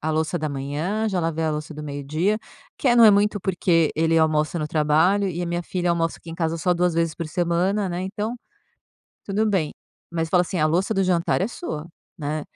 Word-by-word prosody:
a 160 - -1
louça 160 +2 0
da 155 -1 -2
manhã, 145 +10 -2
eu - - +1
já 185 -2 0
lavei 165 -1 -1
a 160 - +1
louça 150 +1 -4
do 150 - -7
meio-dia", 150 +8 -1 0.4
que 275 - +1
é 240 - +4
não 235 - +8
é 215 - +9
muito, 205 +1 +3
porque 175 -4 +2
ele 165 +1 +2
almoça 155 +1 +2
no 155 - -2
trabalho 160 +7 +2
e 175 0 -3
a - - -2
minha 175 +1 -2
filha 175 0 -1
almoça 165 -1 0
aqui 165 - -11
em - - -6
casa 165 -1 -1
só 180 +2 +1
2 175 -1 +1
vezes 165 -1 0
por 170 - -5
semana, 180 +5 0
né, 175 0 -3
então, 210 +4 -3 0.9
tudo 205 +2 0
bem. 185 -8 0 0.4
Mas 165 -1 -2
eu - - -20
falo 180 - +4
assim: 180 +1 -2
"A 155 - +4
louça 180 +7 +1
do 195 -1 +2
jantar 180 0 +1
é - - +2
sua, 170 - -6 0.3
né". 150 0 -3
170 Hz, 235 wpm, -23 LUFS, 155-190 Hz, 0.9 s, é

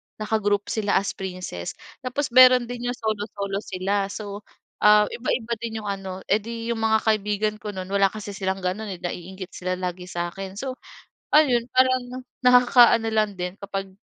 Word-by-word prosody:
naka-group 210 -1 -1
sila 210 -2 0
as 200 - +1
princess. 180 - -6 0.2
Tapos 260 +1 -3
meron 255 0 +8
din 245 0 -5
yung 245 - -1
solo-solo 205 -3 -3
sila. 195 0 -1
So, 205 0 -6 0.4
ah, 210 0 +6
iba-iba 235 -1 -2
din 220 -2 -5
yung 205 - -4
ano 190 -1 -6
edi 230 +2 -1
yung 225 - -2
mga 220 0 +4
kaibigan 215 -1 +1
ko 210 - -5
no'n, 185 -1 -4
wala 200 -1 +4
kasi 210 -1 -7
silang 190 -1 -3
ganun, 195 +4 -2
eh, 185 - -5
na-iinggit 185 +2 -6
sila 185 0 -3
lagi 180 0 -5
sa'kin. 190 +2 -5
So, 260 +4 -5 0.6
ayon 250 -6 +4
parang 255 0 +2 0.2
nakaka-ano 245 -2 +6
lang 215 -2 +1
din 180 0 -3
kapag 195 -1 -5
210 Hz, 160 wpm, -24 LUFS, 195-235 Hz, 0.6 s, meron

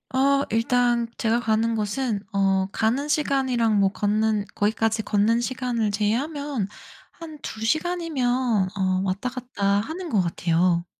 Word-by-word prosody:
어 275 +1 +3
일단 240 +1 +2
제가 230 +1 +1
가는 225 0 +1
곳은 215 +1 -1
어 195 -1 +2
가는 245 +8 0
시간이랑 260 -7 +1
뭐 195 -1 +4
걷는 210 +1 0
거기까지 220 +1 0
걷는 215 +3 +2
시간을 240 -3 -1
제외하면 250 +3 -1 0.4
한 315 -3 -10
2 220 - -7
시간이면 260 - 0
어 185 -1 +1
왔다 195 +5 -2
갔다 250 -5 -5 0.2
하는 335 - -6
것 210 -8 +2
같아요. 170 0 +1
230 Hz, 260 characters per minute, -24 LUFS, 205-260 Hz, 0.4 s, 뭐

